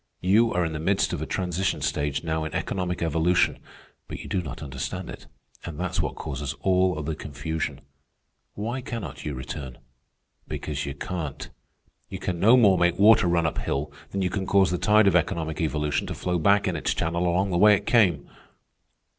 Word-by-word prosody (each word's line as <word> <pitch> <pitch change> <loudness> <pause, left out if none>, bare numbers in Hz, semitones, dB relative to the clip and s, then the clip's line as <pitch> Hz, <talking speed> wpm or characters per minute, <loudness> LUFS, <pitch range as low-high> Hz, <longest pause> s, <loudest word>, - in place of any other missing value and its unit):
You 110 +6 +4
are 90 -1 +1
in 80 - -3
the 75 - -4
midst 95 +5 +1
of - - -3
a - - -4
transition 90 0 -1
stage 75 0 -1
now 80 -1 -1
in 80 - -5
economic 90 -2 -2
evolution, 85 +2 +2 0.5
but - - -6
you - - -9
do 95 - -1
not 75 -2 -7
understand 70 -3 -5
it, - - -11 0.4
and 85 -2 -7
that's 90 0 -1
what - - -3
causes 70 0 -5
all 95 -3 +2
the 80 +2 -2
confusion. 75 0 -4 0.7
Why 115 +5 -3
cannot 115 - -6
you 75 - -3
return? 65 0 -7 0.7
Because 75 -1 -4
you 70 - -5
can't. 80 -3 -5 0.6
You - - -5
can 90 -2 -3
no 115 +7 +6
more 100 -7 +5
make 85 0 +2
water 105 -2 +6
run 85 -1 +2
up 80 - -1
hill 70 +1 -2 0.2
than 95 -1 -1
can 95 +2 -2
you 95 - -5
cause 95 -3 +4
the 90 - -1
tide 105 +1 +4
of 95 - +4
economic 80 0 0
evolution 75 -1 -1
to - - -4
flow 90 -1 -1
back 100 +5 +3
in 90 - -1
its 75 - -1
channel 85 +2 0
along 95 +3 +1
the 85 - +1
way 105 +1 +7
it - - -5
came. 95 - +3
85 Hz, 195 wpm, -25 LUFS, 75-95 Hz, 0.7 s, way